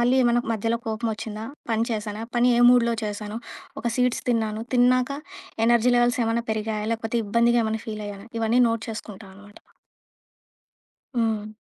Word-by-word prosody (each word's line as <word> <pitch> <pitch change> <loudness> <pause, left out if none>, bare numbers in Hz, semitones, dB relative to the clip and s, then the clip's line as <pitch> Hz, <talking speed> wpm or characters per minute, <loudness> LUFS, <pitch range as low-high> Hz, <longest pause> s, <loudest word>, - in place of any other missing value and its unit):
మళ్ళీ 245 +2 +3
ఏమైనా 240 0 +3
మధ్యలో 225 +2 -1
కోపమొచ్చిందా? 220 -1 -3 0.3
పని 225 +1 +2
చేశానా? 215 -1 -3
పని 245 +1 +4
ఏ - - +3
మూడ్‍లో 235 -2 +4
చేశాను? 210 +1 -4 0.4
ఒక 235 - -5
సీడ్స్ 250 -1 +1
తిన్నాను. 220 -2 0
తిన్నాక 250 +1 +4 0.6
ఎనర్జీ 240 +1 +4
లెవెల్స్ 240 +1 +3
ఏమన్నా 230 +1 0
పెరిగాయా? 215 -1 -2
లేకపోతే 230 +1 -2
ఇబ్బందిగా 235 +3 +3
ఏమన్నా 220 0 -2
ఫీల్ 215 -1 -5
అయ్యానా? 200 +1 -9
ఇవన్నీ 230 +2 +2
నోట్ 230 -1 -2
చేసుకుంటానమాట. 205 -1 -10 1.6
హ్మ్. 220 -3 0
225 Hz, 140 wpm, -24 LUFS, 215-235 Hz, 1.6 s, పని